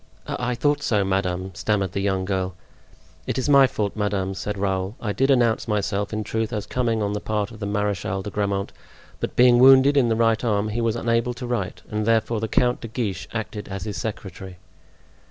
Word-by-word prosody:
"I 125 0 -2
thought 145 +3 +1
so, 105 -8 +1
madame," 95 -1 -1
stammered 100 0 -1
the 100 - -3
young 95 -1 0
girl. 95 -2 -2 0.7
"It - - -2
is 130 - -1
my 140 -2 +7
fault, 105 -6 -3
madame," 100 -3 -1
said 100 +2 -4
Raoul. 95 +1 -1
"I 105 -3 -2
did 135 +5 +1
announce 120 -4 +3
myself, 100 -1 -1
in 110 -1 -2
truth, 110 +1 -2
as 105 -3 -3
coming 115 -2 0
on 100 0 -1
the 105 - -2
part 105 0 -2
of 110 - -11
the 100 - -3
Marechal 100 -2 -1
de 105 - -6
Grammont; 100 -1 -2 0.5
but - - -4
being 125 -1 +6
wounded 135 +2 +7
in 130 -4 +4
the 115 - +2
right 115 0 +2
arm 105 -2 +1
he 115 +3 -2
was 115 -1 +1
unable 115 +1 0
to 125 - -6
write 120 -6 -3
and 105 0 -2
therefore 115 0 +2
the 110 - -2
Count 125 +2 +1
de 115 - -5
Guiche 100 -6 -3
acted 110 -2 -5
as 95 -1 -5
his 105 -3 -5
secretary." 95 -2 -6
105 Hz, 210 wpm, -23 LUFS, 100-115 Hz, 0.7 s, my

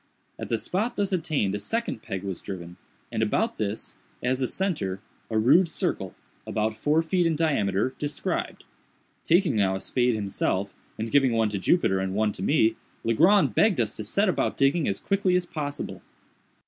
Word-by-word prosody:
At - - -5
the 115 - +1
spot 210 - -1
thus 200 -1 -1
attained 155 - 0
a 105 - -2
second 225 - -2
peg 95 0 -5
was 95 -3 -4
driven, 90 -3 -7 0.3
and - - -1
about - - 0
this, 105 0 -3 0.3
as 130 +2 0
a 130 - +1
centre, 150 - -2 0.3
a 110 - 0
rude 165 +11 +5
circle, - - -2 0.3
about 110 0 -1
four 150 +7 +2
feet 175 +1 +1
in 165 - +1
diameter, 130 - +1
described. 145 -1 -3 0.6
Taking 170 - +3
now 95 -2 +2
a - - -3
spade 125 +3 +1
himself, 100 -1 -1 0.2
and 110 +1 -4
giving 135 -4 +4
one 115 -1 +2
to 100 -1 -3
Jupiter 95 - +2
and 95 0 -2
one 105 0 +2
to 95 - -8
me, 110 0 +2 0.3
Legrand 170 - +4
begged 205 - +3
us 110 -3 0
to 110 - -4
set 200 - +1
about 185 - 0
digging 140 +3 +2
as 100 - -1
quickly 195 -2 +1
as 180 -1 +1
possible. 145 -4 -5
125 Hz, 180 wpm, -26 LUFS, 105-170 Hz, 0.6 s, rude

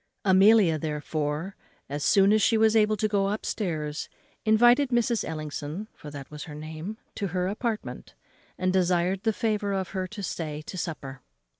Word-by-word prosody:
Amelia, 190 -3 +5
therefore, 150 +3 -3 0.3
as 145 +1 -4
soon 195 +4 +5
as 215 - +3
she 225 - +4
was 220 0 +4
able 215 -1 +4
to 215 - +1
go 200 -2 +1
up 210 +2 -3
stairs, 155 -7 -3 0.4
invited 240 +5 +5
Mrs. 240 -2 +1
Ellison 155 +4 -5
(for 150 - -11
that 140 -1 -9
was 150 0 -7
her 150 - -9
name) 160 +7 -7 0.2
to 200 - -3
her 180 +1 -1
apartment, 215 +2 -4 0.4
and 185 0 0
desired 180 0 +2
the 225 - +2
favour 210 -2 -1
of 190 -2 -2
her 185 -1 -3
to 210 0 -8
stay 155 -4 -4
to 185 - -8
supper. 145 -7 -5
190 Hz, 170 wpm, -27 LUFS, 155-215 Hz, 0.4 s, Amelia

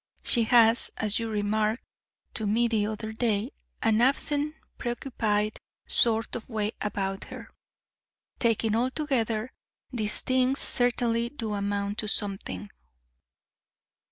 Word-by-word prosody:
She 235 -2 +4
has, 230 0 +5
as 215 0 0
you 230 -1 -3
remarked 215 +2 0 0.5
to 220 - -2
me 230 +3 +2
the 215 -3 0
other 220 0 -5
day, 220 +1 0 0.3
an 225 0 +3
absent, 290 +3 +2 0.2
preoccupied 220 -4 -1 0.3
sort 225 -1 +5
of 240 - -7
way 215 -2 -1
about 195 -2 -3
her. - - -9 0.9
Taken 225 -2 +2
altogether, 245 -2 -1 0.4
these 215 -4 -1
things 255 +1 +1
certainly 235 -1 0
do 225 -6 -4
amount 200 +1 -2
to 215 - -2
something." 195 - -3
225 Hz, 115 wpm, -27 LUFS, 210-240 Hz, 0.9 s, has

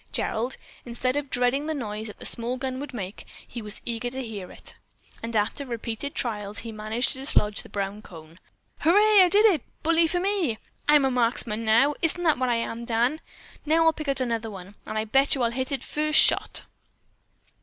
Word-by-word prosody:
Gerald, 240 +4 -1 0.3
instead 255 +2 -1
of 290 -1 -2
dreading 250 +4 +1
the 315 - -1
noise 215 -4 -4
that 210 - -10
the - - -10
small 240 +2 -1
gun 260 0 -3
would 290 - -6
make, 200 -5 -6 0.4
was 210 -1 -6
eager 235 +1 -3
to 260 +1 -5
hear 205 -6 -7
it, - - -8 0.5
and 230 0 -4
after 215 +6 0
repeated 235 +2 -5
trials, 210 -4 -3
he 230 - -5
managed 215 +3 -1
to 265 - +1
dislodge 210 -7 +1
the - - -13
brown 200 +1 -3
cone. 165 -2 -13 0.4
"Hurray! 410 +5 +6
I 365 - +6
did 415 +4 +5
it! 365 - +4 0.2
Bully 330 +1 +4
for 355 +2 0
me! 365 - 0 0.3
I'm 295 -2 +6
a 265 - +2
marksman 230 -2 +1
now! 235 +7 +4
Isn't 345 +1 +1
that 310 -6 +3
what 255 -1 +1
I 240 - +2
am, 230 0 -3
Dan? 240 +6 0 0.4
Now 320 +2 +3
I'll 325 - +5
pick 305 -1 -7
out 275 -1 0
another 230 -3 -1
one, 195 -1 -10
and 215 - -4
I 215 - 0
bet 270 +6 +3
you 260 - -1
I'll 230 - +2
hit 260 +2 -3
it 270 -3 -2
first 305 0 +1
shot." - - +3
245 Hz, 205 wpm, -26 LUFS, 220-290 Hz, 0.5 s, Hurray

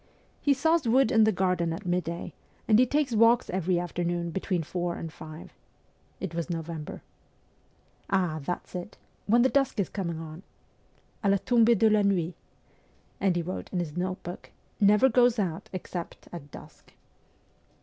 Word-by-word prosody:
'He 285 -1 +3
saws 320 +1 +2
wood 255 +1 +4
in 225 -3 +5
the 220 - +4
garden 180 -3 0
at 165 +4 -6
midday, 175 -1 -2 0.3
and 215 0 +5
he 255 - +5
takes 285 -2 +1
walks 230 +2 +4
every 180 0 0
afternoon 175 -1 -2
between 185 -1 -1
four 175 +2 -3
and 160 -1 -6
five.' 155 0 -10 0.7
It - - -5
was 170 -1 -2
in 170 - -1
November. 160 -1 -7 0.5
\ - - -38
' - - -36
Ah, 180 -5 +1
that's 175 +5 -4
it! 180 +3 -6 0.3
When 235 +3 +5
the - - +5
dusk 275 -5 +1
is 195 - 0
coming 170 -5 -3
on? 160 +1 -8 0.4
' - - -37
(A 200 - +3
la 200 - +4
tombee 235 +2 +4
de 220 - +4
la 215 -1 +4
nuit?) 185 -4 +1 0.9
And 190 -3 +2
he 175 - 0
wrote 185 +3 -5
in 185 - -2
his 170 -4 -3
note 185 +1 -3
book, 175 +1 -8 0.2
' - - -38
Never 210 +5 +5
goes 245 -1 +4
out 180 -6 -2
except 180 -2 -6
at 150 -4 -8
dusk.' - - -14
185 Hz, 180 wpm, -28 LUFS, 170-225 Hz, 0.9 s, in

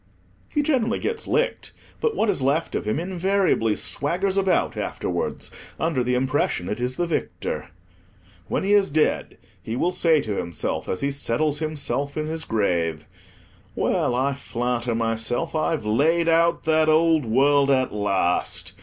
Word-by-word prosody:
He 295 - +1
generally 250 -6 +1
gets 450 0 -3
licked, - - -1 0.3
but 460 -2 0
what 225 - +1
is 195 -8 +1
left 140 +5 0
of - - -2
him 110 +7 0
invariably 185 - +1
swaggers 185 +6 0
about 190 -3 +1
afterwards - - -3 0.3
under 155 -6 0
the 125 +1 0
impression 130 -8 0
it 105 - -3
is 125 +1 -2
the 175 - 0
victor. 170 - -3 0.8
When - - -1
he 200 +2 +2
is 200 -1 +4
dead, 155 +1 0 0.2
he 110 - -5
will 170 +8 +1
say 165 -3 +3
to 110 -7 -3
himself, 85 0 -3
as 95 - -2
he 140 - 0
settles 140 +2 0
himself 145 -2 -2
in 155 - -1
his 160 +1 -3
grave—"Well, 85 +3 -2
I 135 +3 +1
flatter 125 -3 -2
myself 115 +6 -1
I've 155 -5 -1
laid 160 +10 +2
out 165 +1 +3
that 155 0 +3
old 160 -1 +4
world 140 +4 +3
at 130 -2 +2
last. 90 -3 0
145 Hz, 155 wpm, -23 LUFS, 115-170 Hz, 0.8 s, is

